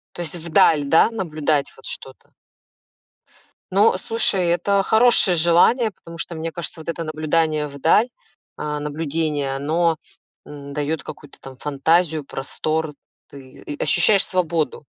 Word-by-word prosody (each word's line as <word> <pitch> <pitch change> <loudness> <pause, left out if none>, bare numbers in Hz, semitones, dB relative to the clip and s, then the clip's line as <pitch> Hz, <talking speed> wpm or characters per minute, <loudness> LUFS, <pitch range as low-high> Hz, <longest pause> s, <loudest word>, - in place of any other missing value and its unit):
То 175 - -6
есть 170 0 0
вдаль, 160 -3 +2
да, 160 +9 +4
наблюдать 155 -8 -1
вот 135 - -17
что-то. 135 -1 -9 1.4
Ну, 200 0 +3
слушай, 195 -4 +1
это 185 +4 +1
хорошее 220 -5 +4
желание, 175 +8 +3
потому 165 -2 -13
что, 170 - -4
мне 160 +1 -4
кажется, 170 -1 -6
вот 155 - -8
это 165 0 -3
наблюдание 155 0 -1
вдаль, 160 - +2 0.5
а, 150 0 -4
наблюдение, 150 -2 -2
оно, 160 +4 0 0.5
м, 140 -1 -10
даёт 150 0 -3
какую-то 145 -2 -11
там 135 -1 -11
фантазию, 155 +2 0
простор, 155 +3 -3 0.4
ты, 135 -2 -14
э, 145 - -4
ощущаешь 195 +6 +4
свободу. 165 -6 -2
160 Hz, 130 wpm, -21 LUFS, 150-175 Hz, 1.4 s, да